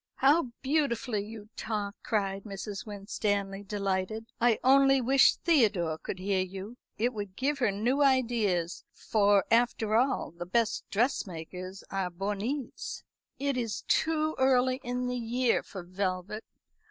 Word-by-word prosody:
"How 290 +2 +4 0.2
beautifully 260 -7 0
you 215 0 -10
talk," 210 -2 -3
cried 195 -3 -1
Mrs. 200 +1 -6
Winstanley, 200 -1 -2
delighted. 200 +1 -2 0.2
"I 235 -2 +4
only 270 +1 +6
wish 260 +1 +5
Theodore 205 - +2
could - - -5
hear 190 0 0
you. 195 +5 -6 0.2
It 240 +3 +1
would 205 -3 -6
give 280 +4 0
her 245 -5 +3
new 235 +8 0
ideas; 230 -10 +2
for, 205 -2 +2
after 230 -2 +2
all, 255 -3 +1
the 175 +1 -8
best 230 +3 +1
dressmakers 185 - -2
are 195 -2 -1
bornées. 210 +9 -4 0.3
It 280 -1 -1
is 230 -5 -2
too 315 -1 +1
early 260 0 +3
in 250 +1 -2
the 250 0 -2
year 240 +1 +1
for 190 -3 -9
velvet. 185 +3 -3
215 Hz, 135 wpm, -29 LUFS, 195-250 Hz, 0.3 s, only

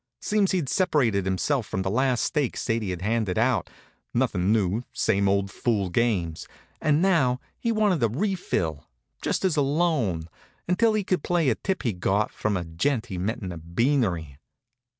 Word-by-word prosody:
Seems 205 -2 +1
he'd 175 -7 0
separated 130 - +2
himself 105 +6 0
from 95 - -2
the 95 - -1
last 130 +1 +1
stake 145 -5 0
Sadie 115 -3 -1
had 90 -1 -4
handed 110 -3 0
out 120 0 +1 0.5
nothin' 105 -6 +1
new, 105 0 +1
same 100 -2 +1
old 100 0 +1
fool 100 -6 -1
games 90 -7 0 0.3
and 155 +2 +3
now 140 -10 +3 0.2
he 230 - 0
wanted 210 - +2
a 115 - +3
refill, 110 - -2 0.3
just - - -1
as 180 -4 +2
a - - +4
loan, 135 - +1 0.4
until 220 +6 +3
he 210 - +1
could 185 -3 0
play 170 -4 +1
a - - +3
tip 190 - -3
he'd 105 -8 -2
got 100 +3 +1
from 105 -2 -1
a 90 - -4
gent 115 - -1
he'd 90 - -3
met 110 +5 -2
in 90 - -4
a 85 - -7
beanery. 85 - 0
115 Hz, 175 wpm, -26 LUFS, 95-150 Hz, 0.5 s, a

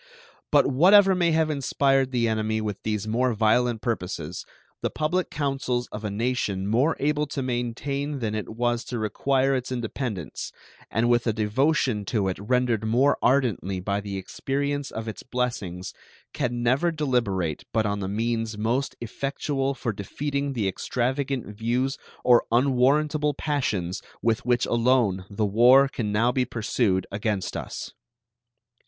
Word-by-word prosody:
But 145 -1 +5
whatever 190 +8 +6
may 175 -2 +2
have 160 -1 +2
inspired 135 -1 +2
the 120 -3 +1
enemy 110 0 0
with 105 -2 -4
these 105 -1 -2
more 120 +2 +1
violent 115 +1 +2
purposes, 90 -7 -3 0.3
the - - 0
public 165 +4 -1
councils 135 -4 -1
of 105 - -6
a 105 - -2
nation 105 -3 -1
more 125 +10 +2
able 150 +1 +1
to 140 -1 -3
maintain 130 +4 -2
than 110 -5 -2
it 110 -1 -3
was 120 +1 -1
to 125 - -4
require 135 +5 +1
its 130 -1 -2
independence, 120 - -4 0.4
and 115 +2 +1
with 120 0 +2
a 110 - +2
devotion 110 +1 +1
to 100 -2 0
it 95 - -4
rendered 120 +1 +1
more 125 +6 +3
ardently 115 -8 +1
by 100 +2 -1
the 100 -1 -5
experience 140 +8 -2
of 110 0 -6
its 110 - -6
blessings, 105 -8 -3 0.4
can 120 -1 -2
never 130 +8 +3
deliberate 120 - -1
but 110 -1 +1
on 100 0 -1
the 95 - -3
means 115 +1 -1
most 120 +6 -1
effectual 135 +3 -2
for 120 -3 -3
defeating 140 +7 -3
the 110 -6 -1
extravagant 130 +6 -1
views 120 +6 -1 0.2
or 120 -1 +5
unwarrantable 140 +4 +2
passions 110 - -1 0.2
with 115 0 0
which 120 -1 +3
alone 115 -6 +2
the 105 +1 -1
war 125 +7 +6
can 115 -6 -3
now 115 +4 +3
be 130 0 +1
pursued 105 -5 0
against 100 -1 -2
us. - - -5
120 Hz, 150 wpm, -25 LUFS, 110-135 Hz, 0.4 s, whatever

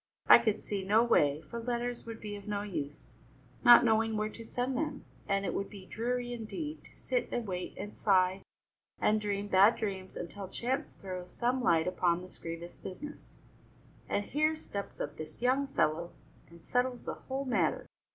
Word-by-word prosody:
I - - +10
could 215 -2 0
see 200 -2 -3
no 210 +4 +4
way, 150 -10 +3
for 235 - -6
letters 240 0 -2
would 225 -1 -6
be 210 -1 -5
of 200 0 -10
no 205 -1 -1
use, 150 -8 -5 0.5
not 240 0 +9
knowing 225 -1 +3
where 215 0 0
to 230 - -10
send 250 +3 -2
them, 300 -1 -2 0.2
and 200 -1 +1
it - - -1
would 200 - -2
be 195 -3 -10
dreary, 245 +3 -2
indeed, 295 +7 -5
to - - -15
sit - - -1
and 240 - -1
wait 180 -2 -4
and 205 - -6
sigh 190 -1 +3 0.6
and 215 0 +3
dream 205 -1 -1
bad 200 +3 +6
dreams 190 -3 -4
until 190 +3 -6
chance 260 +8 -2
throws 185 -2 -7
some 250 +2 0
light 165 -9 +4
upon 180 -1 +1
this 185 - -11
grievous 170 +1 -7
business, 290 +11 -9 0.7
and 205 - 0
here 310 +2 +2
steps 200 -10 -6
up 145 +1 -4
this 155 0 -8
young 265 +3 +3
fellow 170 - 0 0.4
and 170 0 -16
settles 250 0 0
the - - -2
whole 270 +1 -4
matter. 195 - +1
210 Hz, 180 wpm, -32 LUFS, 185-245 Hz, 0.7 s, I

